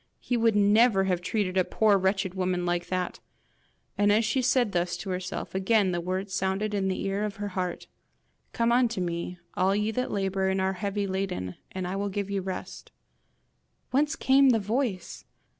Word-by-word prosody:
HE 245 Hz, -, -2 dB
would 230 Hz, -2 st, +3 dB
never 205 Hz, 0 st, +4 dB
have 180 Hz, -2 st, 0 dB
treated 190 Hz, 0 st, -1 dB
a 185 Hz, -, +5 dB
poor 215 Hz, +2 st, +3 dB
wretched 190 Hz, -1 st, 0 dB
woman 180 Hz, -1 st, -1 dB
like 175 Hz, 0 st, -1 dB
that! 185 Hz, -1 st, -2 dB, 0.8 s
And 205 Hz, 0 st, +4 dB
as 215 Hz, +2 st, +3 dB
she 235 Hz, +5 st, +1 dB
said 245 Hz, -3 st, +2 dB
thus 175 Hz, -1 st, -1 dB
to 185 Hz, +2 st, -5 dB
herself, 180 Hz, 0 st, -4 dB
again 190 Hz, 0 st, +2 dB
the 175 Hz, -1 st, -1 dB
words 185 Hz, +2 st, -3 dB
sounded 190 Hz, +3 st, -1 dB
in 195 Hz, -2 st, 0 dB
the 185 Hz, -, -2 dB
ear 195 Hz, +1 st, -1 dB
of 210 Hz, -1 st, -3 dB
her 205 Hz, 0 st, -4 dB
heart: 185 Hz, -2 st, -3 dB, 0.7 s
'COME 235 Hz, 0 st, +1 dB
UNTO 240 Hz, -3 st, +2 dB
ME, 175 Hz, 0 st, -3 dB, 0.2 s
ALL 190 Hz, +2 st, +2 dB
YE 210 Hz, +1 st, 0 dB
THAT 250 Hz, +3 st, -2 dB
LABOUR 195 Hz, -1 st, 0 dB
AND 190 Hz, 0 st, 0 dB
ARE 190 Hz, 0 st, +1 dB
HEAVY 200 Hz, +1 st, -2 dB
LADEN, 190 Hz, -, -3 dB, 0.2 s
AND 185 Hz, -1 st, -4 dB
I 185 Hz, -, -3 dB
WILL 200 Hz, +1 st, -1 dB
GIVE 200 Hz, 0 st, -3 dB
YOU 200 Hz, -1 st, -1 dB
REST.' 185 Hz, 0 st, -7 dB, 1.0 s
Whence 295 Hz, +4 st, +2 dB
came 270 Hz, +1 st, +4 dB
the 230 Hz, -3 st, +4 dB
voice? 215 Hz, -2 st, -2 dB
195 Hz, 190 wpm, -27 LUFS, 185-215 Hz, 1.0 s, a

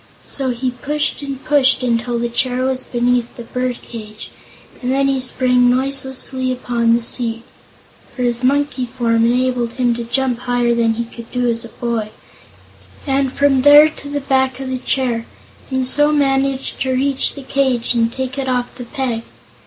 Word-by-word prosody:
So 270 Hz, -2 st, -3 dB
he 250 Hz, +1 st, -1 dB
pushed 290 Hz, +5 st, -1 dB
and 275 Hz, -2 st, -6 dB
pushed 270 Hz, -3 st, +3 dB
until 240 Hz, 0 st, 0 dB
the 235 Hz, 0 st, -1 dB
chair 250 Hz, +1 st, -1 dB
was 260 Hz, 0 st, -1 dB
beneath 245 Hz, -1 st, 0 dB
the 235 Hz, -, -8 dB
bird 250 Hz, +1 st, -3 dB
cage, 215 Hz, -2 st, -9 dB, 0.5 s
and 250 Hz, 0 st, -1 dB
then 275 Hz, +1 st, +2 dB
he 270 Hz, -1 st, +1 dB
sprang 250 Hz, -1 st, +2 dB
noiselessly 265 Hz, 0 st, -1 dB
upon 235 Hz, -2 st, +1 dB
the 235 Hz, -, -1 dB
seat 230 Hz, -1 st, 0 dB, 0.7 s
for 250 Hz, -, -2 dB
his 240 Hz, 0 st, 0 dB
monkey 280 Hz, -1 st, +1 dB
form 230 Hz, -2 st, +1 dB
enabled 245 Hz, -1 st, 0 dB
him 245 Hz, -1 st, +1 dB
to 235 Hz, 0 st, -4 dB
jump 245 Hz, +1 st, 0 dB
higher 245 Hz, -1 st, +1 dB
than 230 Hz, -1 st, +2 dB
he 235 Hz, +1 st, -2 dB
could 230 Hz, 0 st, -11 dB
do 250 Hz, -1 st, 0 dB
as 230 Hz, 0 st, 0 dB
a -, -, -10 dB
boy 230 Hz, -3 st, -3 dB, 1.0 s
and 270 Hz, -2 st, +1 dB
from 275 Hz, -1 st, +2 dB
there 290 Hz, +2 st, +8 dB
to 290 Hz, -2 st, -9 dB
the 285 Hz, 0 st, -2 dB
back 265 Hz, -1 st, +1 dB
of 265 Hz, -1 st, -4 dB
the 255 Hz, -, -2 dB
chair, 245 Hz, -3 st, -1 dB, 0.4 s
and 260 Hz, -1 st, 0 dB
so 295 Hz, +3 st, +3 dB
managed 270 Hz, -2 st, 0 dB
to 260 Hz, -1 st, 0 dB
reach 270 Hz, +1 st, +1 dB
the 280 Hz, -, -8 dB
cage 260 Hz, -3 st, 0 dB
and 230 Hz, -1 st, +1 dB
take 260 Hz, +2 st, -4 dB
it 265 Hz, -1 st, -2 dB
off 250 Hz, -1 st, -1 dB
the 245 Hz, -1 st, -8 dB
peg. 245 Hz, -3 st, -3 dB
255 Hz, 180 wpm, -18 LUFS, 240-270 Hz, 1.0 s, there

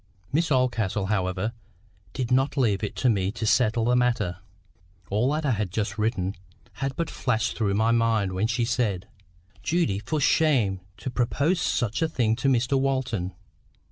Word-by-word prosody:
Miss 160 Hz, +1 st, +1 dB
Oldcastle, 115 Hz, -7 st, +1 dB
however, 95 Hz, +3 st, -1 dB, 0.6 s
did 125 Hz, -2 st, -3 dB
not 135 Hz, +3 st, +2 dB
leave 110 Hz, -6 st, +2 dB
it 105 Hz, -, -3 dB
to 130 Hz, -, +1 dB
me 100 Hz, -4 st, +2 dB
to 110 Hz, -1 st, -3 dB
settle 115 Hz, +1 st, +2 dB
the 125 Hz, +1 st, +3 dB
matter. 115 Hz, -8 st, +1 dB, 0.7 s
All 115 Hz, +7 st, +2 dB
that 155 Hz, +1 st, -1 dB
I 140 Hz, -, +2 dB
have 105 Hz, -4 st, -1 dB
just 105 Hz, +2 st, -3 dB
written 100 Hz, -4 st, 0 dB, 0.5 s
had 135 Hz, -1 st, -1 dB
but 170 Hz, -, -1 dB
flashed 115 Hz, -7 st, -1 dB
through 100 Hz, -4 st, 0 dB
my 110 Hz, +2 st, +2 dB
mind 115 Hz, -4 st, +2 dB
when 95 Hz, +4 st, 0 dB
she 115 Hz, +1 st, 0 dB
said:— 110 Hz, -5 st, -1 dB, 0.5 s
"Judy, 160 Hz, -, 0 dB
for 150 Hz, +9 st, -2 dB
shame 130 Hz, -10 st, +3 dB, 0.2 s
to 105 Hz, +5 st, -5 dB
propose 140 Hz, +9 st, +1 dB
such 115 Hz, +2 st, 0 dB
a 160 Hz, -, +2 dB
thing 115 Hz, -7 st, +1 dB
to 130 Hz, -, -1 dB
Mr 130 Hz, +1 st, +2 dB
Walton! 130 Hz, -9 st, -1 dB
115 Hz, 170 wpm, -26 LUFS, 105-130 Hz, 0.7 s, the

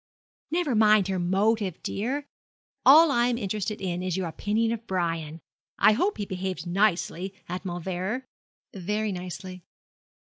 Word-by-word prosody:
'Never 335 Hz, -5 st, 0 dB
mind 215 Hz, -3 st, +5 dB
her 190 Hz, -1 st, 0 dB
motive, 195 Hz, +1 st, +1 dB
dear. 265 Hz, +8 st, -2 dB, 0.6 s
All 310 Hz, +3 st, +8 dB
I 240 Hz, -2 st, +3 dB
am 245 Hz, -1 st, 0 dB
interested 210 Hz, 0 st, -3 dB
in 180 Hz, -2 st, -2 dB
is 185 Hz, -1 st, -2 dB
your 185 Hz, -2 st, -1 dB
opinion 215 Hz, +7 st, 0 dB
of 230 Hz, 0 st, -5 dB
Brian. 165 Hz, -3 st, -2 dB, 0.4 s
I -, -, +6 dB
hope 370 Hz, -, +1 dB
he 205 Hz, -, -3 dB
behaved 185 Hz, -1 st, -4 dB
nicely 190 Hz, 0 st, 0 dB
at 180 Hz, +1 st, -5 dB
Mauleverer.' 185 Hz, +7 st, -3 dB, 0.5 s
'Very 210 Hz, +3 st, -2 dB
nicely.' 185 Hz, 0 st, -7 dB
195 Hz, 140 wpm, -26 LUFS, 180-220 Hz, 0.6 s, All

